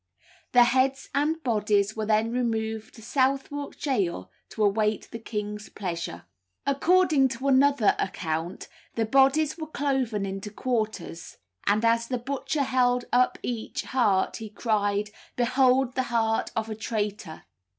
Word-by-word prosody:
The 245 Hz, -1 st, +8 dB
heads 260 Hz, +2 st, +1 dB
and 310 Hz, +3 st, 0 dB
bodies 210 Hz, -3 st, +1 dB
were 215 Hz, -1 st, -3 dB
then 220 Hz, +1 st, +2 dB
removed 220 Hz, -3 st, -2 dB
to 225 Hz, -, -13 dB
Southwark 275 Hz, +3 st, -1 dB
gaol 180 Hz, -, -1 dB, 0.2 s
to 220 Hz, -, -2 dB
await 210 Hz, +1 st, +1 dB
the 230 Hz, -, -6 dB
king's 210 Hz, -2 st, -5 dB
pleasure. 170 Hz, -, -5 dB, 0.4 s
According 300 Hz, 0 st, +3 dB
to 260 Hz, +2 st, -4 dB
another 275 Hz, -4 st, +4 dB
account 165 Hz, 0 st, -3 dB, 0.3 s
the 225 Hz, -, +1 dB
bodies 275 Hz, +6 st, +3 dB
were 315 Hz, -, -4 dB
cloven 265 Hz, -9 st, -1 dB
into 195 Hz, +1 st, -5 dB
quarters; 215 Hz, -7 st, -3 dB, 0.3 s
and 210 Hz, +3 st, +3 dB
as 230 Hz, 0 st, +2 dB
the 250 Hz, -, -1 dB
butcher 275 Hz, +3 st, -2 dB
held 250 Hz, -1 st, +2 dB
up 250 Hz, +1 st, +3 dB
each 235 Hz, -3 st, -3 dB
heart 210 Hz, -7 st, +1 dB
he 220 Hz, -2 st, -7 dB
cried, 210 Hz, -1 st, 0 dB, 0.2 s
"Behold 255 Hz, +1 st, +3 dB
the 260 Hz, -, +1 dB
heart 225 Hz, -1 st, +1 dB
of 220 Hz, 0 st, -1 dB
a 220 Hz, -, -4 dB
traitor!" 210 Hz, -6 st, -4 dB
230 Hz, 140 wpm, -26 LUFS, 210-265 Hz, 0.4 s, The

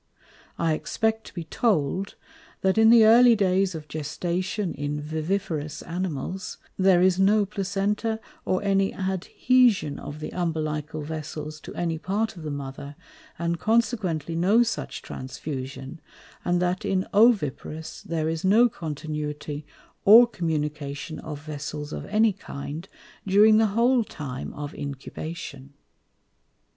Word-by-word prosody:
I 165 Hz, -1 st, +1 dB
expect 220 Hz, +7 st, -1 dB
to -, -, -12 dB
be 170 Hz, -, -4 dB
told, 185 Hz, -, 0 dB, 0.5 s
that 190 Hz, +3 st, +2 dB
in 220 Hz, 0 st, +7 dB
the 230 Hz, -1 st, +8 dB
early 235 Hz, +2 st, +7 dB
Days 190 Hz, -2 st, +2 dB
of 155 Hz, -1 st, -7 dB
Gestation 175 Hz, +6 st, -2 dB
in 145 Hz, +1 st, -3 dB
Viviparous 155 Hz, 0 st, -3 dB
Animals, 180 Hz, +1 st, -4 dB, 0.2 s
there 185 Hz, -2 st, +4 dB
is 185 Hz, 0 st, +3 dB
no 205 Hz, +2 st, +4 dB
Placenta, 205 Hz, +3 st, -1 dB, 0.2 s
or 185 Hz, -, 0 dB
any 195 Hz, -1 st, +2 dB
Adhesion 190 Hz, -, +2 dB
of 145 Hz, -, -7 dB
the 155 Hz, -, -5 dB
Umbilical 155 Hz, -3 st, -2 dB
Vessels 155 Hz, 0 st, -6 dB
to -, -, -10 dB
any 165 Hz, -2 st, -1 dB
part 210 Hz, +5 st, -1 dB
of 170 Hz, -, -10 dB
the 155 Hz, -, -5 dB
Mother, 140 Hz, 0 st, -6 dB, 0.4 s
and 170 Hz, 0 st, -1 dB
consequently 215 Hz, -, 0 dB
no 200 Hz, +8 st, +4 dB
such 225 Hz, -1 st, -4 dB
Transfusion; 135 Hz, +2 st, -6 dB, 0.4 s
and 175 Hz, 0 st, +1 dB
that 180 Hz, +1 st, 0 dB
in 190 Hz, -1 st, 0 dB
Oviparous 195 Hz, -, +2 dB
there 160 Hz, -1 st, -2 dB
is 160 Hz, 0 st, -2 dB
no 220 Hz, +6 st, +5 dB
continuity, 150 Hz, -3 st, -5 dB, 0.4 s
or 225 Hz, +4 st, +9 dB
communication 150 Hz, -6 st, -3 dB
of 150 Hz, -2 st, -7 dB
Vessels 150 Hz, 0 st, -5 dB
of -, -, -6 dB
any 215 Hz, +1 st, +3 dB
kind, 160 Hz, -1 st, -7 dB, 0.4 s
during 210 Hz, +3 st, +6 dB
the 220 Hz, 0 st, +4 dB
whole 245 Hz, +1 st, +4 dB
time 140 Hz, -, -6 dB
of 145 Hz, 0 st, -6 dB
Incubation. 140 Hz, 0 st, -7 dB
170 Hz, 130 wpm, -25 LUFS, 150-200 Hz, 0.5 s, or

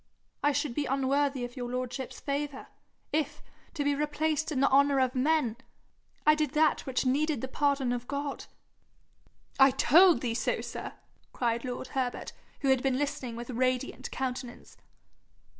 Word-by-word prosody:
I 290 Hz, -, +3 dB
should 285 Hz, -2 st, -1 dB
be 285 Hz, +2 st, -1 dB
unworthy 275 Hz, 0 st, +1 dB
of 245 Hz, -, -10 dB
your 245 Hz, -2 st, -4 dB
lordship's 255 Hz, +1 st, -4 dB
favour, 285 Hz, -1 st, -4 dB, 0.4 s
if, 300 Hz, -1 st, -1 dB, 0.3 s
to 295 Hz, -, -1 dB
be 285 Hz, 0 st, +2 dB
replaced 300 Hz, +2 st, -1 dB
in 275 Hz, -, -1 dB
the 275 Hz, -, +4 dB
honour 280 Hz, 0 st, +5 dB
of 255 Hz, -1 st, +2 dB
men, 260 Hz, -3 st, +1 dB, 0.7 s
I 305 Hz, -, +7 dB
did 305 Hz, -2 st, -1 dB
that 305 Hz, -2 st, +2 dB
which 260 Hz, 0 st, 0 dB
needed 285 Hz, 0 st, +1 dB
the 260 Hz, -, -3 dB
pardon 275 Hz, -2 st, +1 dB
of 245 Hz, 0 st, -4 dB
God.' 280 Hz, 0 st, -4 dB, 1.1 s
'I 270 Hz, 0 st, +8 dB
told 350 Hz, +5 st, +6 dB
thee 235 Hz, -3 st, -1 dB
so, 235 Hz, -, 0 dB
sir!' -, -, -6 dB, 0.4 s
cried 235 Hz, -1 st, -1 dB
lord 255 Hz, 0 st, -5 dB
Herbert, 255 Hz, -2 st, -3 dB, 0.3 s
who 275 Hz, -, +1 dB
had 265 Hz, -1 st, +4 dB
been 265 Hz, -1 st, +1 dB
listening 265 Hz, -4 st, -3 dB
with 240 Hz, +2 st, -6 dB
radiant 255 Hz, +2 st, -1 dB
countenance. 255 Hz, -2 st, -5 dB
270 Hz, 160 wpm, -29 LUFS, 255-290 Hz, 1.1 s, I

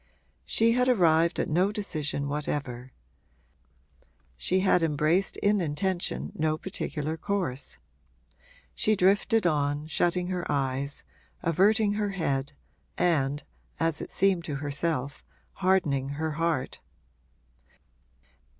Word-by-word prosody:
She 230 Hz, +1 st, +3 dB
had 250 Hz, +2 st, +2 dB
arrived 170 Hz, -7 st, +3 dB
at -, -, 0 dB
no 180 Hz, +6 st, +2 dB
decision 155 Hz, -9 st, -2 dB
whatever; 140 Hz, -4 st, -3 dB, 1.4 s
she 185 Hz, -, 0 dB
had 190 Hz, -2 st, +3 dB
embraced 160 Hz, +4 st, +1 dB
in 205 Hz, -1 st, +2 dB
intention 160 Hz, -, -1 dB
no 155 Hz, 0 st, 0 dB
particular 160 Hz, -4 st, -3 dB
course. 170 Hz, -9 st, -3 dB, 1.0 s
She 215 Hz, -, +2 dB
drifted 200 Hz, +3 st, +3 dB
on, 145 Hz, -2 st, +1 dB
shutting 175 Hz, +3 st, 0 dB
her 180 Hz, -3 st, -2 dB
eyes, 140 Hz, 0 st, -2 dB, 0.4 s
averting 205 Hz, +5 st, +3 dB
her 205 Hz, -1 st, -1 dB
head 140 Hz, -4 st, -1 dB, 0.4 s
and, 145 Hz, -5 st, +1 dB, 0.4 s
as 165 Hz, -2 st, 0 dB
it -, -, -6 dB
seemed 190 Hz, -3 st, +2 dB
to 145 Hz, -, -3 dB
herself, 145 Hz, 0 st, -2 dB, 0.4 s
hardening 155 Hz, -8 st, +2 dB
her 160 Hz, 0 st, -1 dB
heart. 160 Hz, -3 st, -1 dB
160 Hz, 105 wpm, -28 LUFS, 145-190 Hz, 1.4 s, She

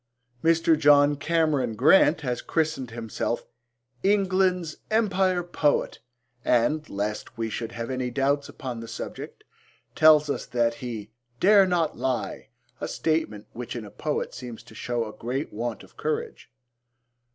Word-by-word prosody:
Mr. 165 Hz, 0 st, +4 dB
John 145 Hz, -1 st, +5 dB
Cameron 145 Hz, -6 st, +1 dB
Grant 155 Hz, -, +5 dB
has 125 Hz, -4 st, -2 dB
christened 155 Hz, -6 st, -1 dB
himself 115 Hz, 0 st, -3 dB, 0.6 s
'England's 185 Hz, -4 st, +2 dB
Empire 195 Hz, -5 st, +2 dB
Poet,' 160 Hz, -4 st, 0 dB, 0.4 s
and, 150 Hz, +6 st, +2 dB
lest 105 Hz, +1 st, -4 dB
we 115 Hz, -1 st, -2 dB
should 115 Hz, 0 st, -4 dB
have 115 Hz, +2 st, -4 dB
any 130 Hz, -1 st, -2 dB
doubts 140 Hz, +3 st, 0 dB
upon 125 Hz, -3 st, -6 dB
the 115 Hz, -, -8 dB
subject, 115 Hz, -, -7 dB, 0.5 s
tells 155 Hz, -1 st, +6 dB
us 140 Hz, -, -3 dB
that 120 Hz, -1 st, +1 dB
he 115 Hz, -4 st, -6 dB, 0.3 s
'dare 200 Hz, 0 st, +6 dB
not 170 Hz, -7 st, 0 dB
lie,' 130 Hz, 0 st, -2 dB, 0.3 s
a -, -, -3 dB
statement 155 Hz, -10 st, -1 dB
which 125 Hz, +1 st, -6 dB
in 115 Hz, -3 st, -5 dB
a 100 Hz, -, -11 dB
poet 150 Hz, +6 st, -3 dB
seems 120 Hz, -3 st, -8 dB
to -, -, -16 dB
show 120 Hz, +1 st, -2 dB
a 105 Hz, -, -8 dB
great 130 Hz, +5 st, -4 dB
want 115 Hz, +2 st, -4 dB
of -, -, -19 dB
courage. 460 Hz, -, -3 dB
145 Hz, 140 wpm, -26 LUFS, 120-165 Hz, 0.6 s, tells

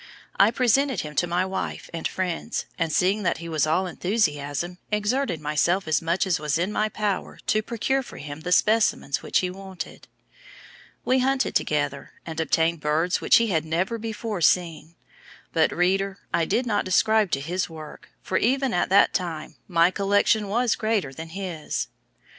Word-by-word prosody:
I 200 Hz, -, +7 dB
presented 255 Hz, +3 st, +2 dB
him 150 Hz, -1 st, -7 dB
to 175 Hz, -, +2 dB
my 175 Hz, +2 st, +1 dB
wife 190 Hz, 0 st, -4 dB
and 165 Hz, -, -2 dB
friends, 185 Hz, +4 st, -3 dB
and 165 Hz, -2 st, 0 dB
seeing 190 Hz, +6 st, +2 dB
that 185 Hz, -, 0 dB
he 170 Hz, -, -8 dB
was 155 Hz, -2 st, +1 dB
all 180 Hz, +5 st, +2 dB
enthusiasm, 175 Hz, -4 st, -1 dB
exerted 210 Hz, -, 0 dB
myself 155 Hz, +5 st, +1 dB
as 160 Hz, -, +2 dB
much 170 Hz, +4 st, 0 dB
as 180 Hz, -4 st, +1 dB
was 150 Hz, 0 st, 0 dB
in 180 Hz, +4 st, -1 dB
my 215 Hz, +1 st, 0 dB
power 210 Hz, -2 st, -2 dB
to 215 Hz, -, +2 dB
procure 240 Hz, +5 st, -1 dB
for 260 Hz, -, -11 dB
him 145 Hz, 0 st, -7 dB
the 175 Hz, +3 st, -5 dB
specimens 215 Hz, -7 st, +2 dB
which -, -, +1 dB
he 180 Hz, -1 st, -2 dB
wanted. 190 Hz, 0 st, -9 dB, 1.0 s
"We 260 Hz, +1 st, +3 dB
hunted 265 Hz, +1 st, +1 dB
together 145 Hz, -2 st, -1 dB
and 160 Hz, -1 st, -5 dB
obtained 165 Hz, +1 st, +1 dB
birds 155 Hz, +4 st, 0 dB
which -, -, +5 dB
he 230 Hz, -1 st, +2 dB
had 160 Hz, -5 st, +1 dB
never 175 Hz, +8 st, -1 dB
before 220 Hz, -3 st, -4 dB
seen; 165 Hz, -1 st, +1 dB, 0.6 s
but, 160 Hz, -1 st, +3 dB
reader, 195 Hz, +2 st, +1 dB, 0.2 s
I 165 Hz, -, +2 dB
did 245 Hz, +9 st, 0 dB
not 210 Hz, -4 st, 0 dB
subscribe 215 Hz, +2 st, +3 dB
to 135 Hz, -, +2 dB
his 175 Hz, +7 st, -2 dB
work, 155 Hz, -2 st, -11 dB
for, 185 Hz, -, 0 dB
even 265 Hz, +2 st, +1 dB
at 175 Hz, -, +1 dB
that 200 Hz, +2 st, +5 dB
time, 165 Hz, -4 st, -3 dB
my 170 Hz, -1 st, +4 dB
collection 205 Hz, +2 st, +2 dB
was 235 Hz, +3 st, +1 dB
greater 215 Hz, -11 st, -1 dB
than 160 Hz, +4 st, -8 dB
his. 175 Hz, -3 st, -4 dB
185 Hz, 175 wpm, -25 LUFS, 160-215 Hz, 1.0 s, I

